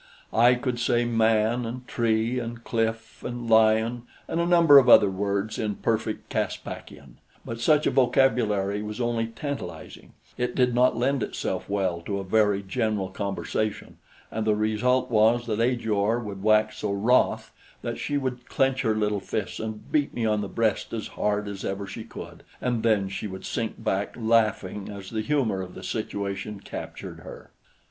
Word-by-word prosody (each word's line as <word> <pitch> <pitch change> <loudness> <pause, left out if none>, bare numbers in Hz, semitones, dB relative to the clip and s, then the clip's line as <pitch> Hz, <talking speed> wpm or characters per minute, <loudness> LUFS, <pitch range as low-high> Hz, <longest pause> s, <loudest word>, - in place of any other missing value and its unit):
I 120 +2 +6
could 125 -1 -2
say 120 0 +2
man 115 0 +2
and 125 +2 -6
tree 115 +1 +1
and 120 -1 -6
cliff 115 -1 -2
and 120 -1 -5
lion 110 +1 +4 0.3
and 165 - -2
a 170 - 0
number 165 -5 +8
of 130 -2 +2
other 105 -4 +8
words 100 +2 -2
in 105 -2 -1
perfect 110 0 -2
Caspakian; - - -5 0.3
but 115 0 -5
such 150 +5 +4
a - - +3
vocabulary 110 -6 +2
was 105 +2 -6
only 120 -2 0
tantalizing; 115 - -7 0.3
it 125 0 -1
did 125 -2 +3
not 125 0 +3
lend 135 +2 +1
itself - - -3
well 95 -4 0
to 100 +3 -3
a 100 - -3
very 105 0 +2
general 100 0 -1
conversation, 100 +2 -3 0.3
and 110 0 -2
the 105 - +4
result 110 +5 +1
was 115 +2 +4
that 110 -1 -1
Ajor 115 -3 +1
would 100 -4 -6
wax 110 +1 +3
so 105 - -2
wroth 110 +6 +2 0.3
that - - -4
she 145 - -1
would 125 -3 -3
clench 135 0 +1
her 110 -4 +1
little 105 -1 0
fists 100 0 -4
and 110 -1 -6
beat 145 -2 +1
me 115 - -1
on 105 -1 +1
the 100 - -4
breast 110 -1 0
as 110 -2 -4
hard 105 0 -1
as 100 -2 -6
ever 100 +1 -3
she 110 +3 -7
could, 115 - -10 0.2
and 120 -3 -1
then 110 -4 +2
she 100 +2 -4
would 95 -1 -8
sink 115 -1 -2
back 100 +1 -1
laughing 110 -4 +1
as 100 -2 -8
the 110 -1 -1
humor 110 -6 0
of 90 -1 -8
the - - -9
situation 100 +1 -4
captured - - -8
her. - - -11
110 Hz, 175 wpm, -26 LUFS, 105-120 Hz, 0.3 s, number